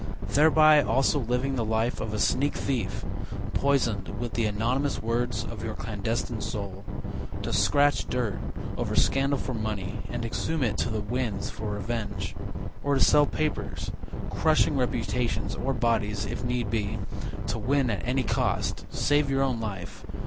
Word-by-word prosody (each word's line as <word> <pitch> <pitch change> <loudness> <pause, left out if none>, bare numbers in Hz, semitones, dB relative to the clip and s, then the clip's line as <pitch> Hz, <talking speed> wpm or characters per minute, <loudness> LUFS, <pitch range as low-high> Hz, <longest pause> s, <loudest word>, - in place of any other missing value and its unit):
Thereby 155 0 +7
also 135 +3 +2
living 125 +2 0
the 115 - +1
life 110 +2 0
of 110 - -2
a 105 - -2
sneak 140 +6 +2
thief, 130 -4 -2 0.5
Poisoned 125 -8 +1
with 120 -1 -3
the 115 - +1
anonymous 120 +7 0
words 120 +2 0
Of - - -6
your - - -3
clandestine - - -2
soul. 100 -1 -4 0.6
To - - -2
scratch 145 0 +3
dirt 120 -6 -1 0.4
over - - -1
scandal 140 +1 +3
for 130 - -3
money, 110 -5 -3
And 120 -1 -3
exhume 155 +6 -1
it 115 - 0
to - - +1
the 110 -2 -1
winds 115 0 -2
for 110 - -4
revenge, 105 +2 -3 0.5
Or 145 0 +2
to - - +2
sell 145 +1 +6
papers, 155 0 -2 0.4
Crushing - - +3
reputations, 125 -2 0
or 135 - -1
bodies, 110 -4 +1
if 115 +4 -4
need 120 -3 -1
be, 105 -3 0 0.5
To 110 +3 -2
win 130 +2 +2
at 100 - -2
any 130 +2 +1
cost, - - 0
save 145 0 +2
your 135 0 +2
own 130 -4 0
life. 100 -5 -5
120 Hz, 155 wpm, -28 LUFS, 110-135 Hz, 0.6 s, Thereby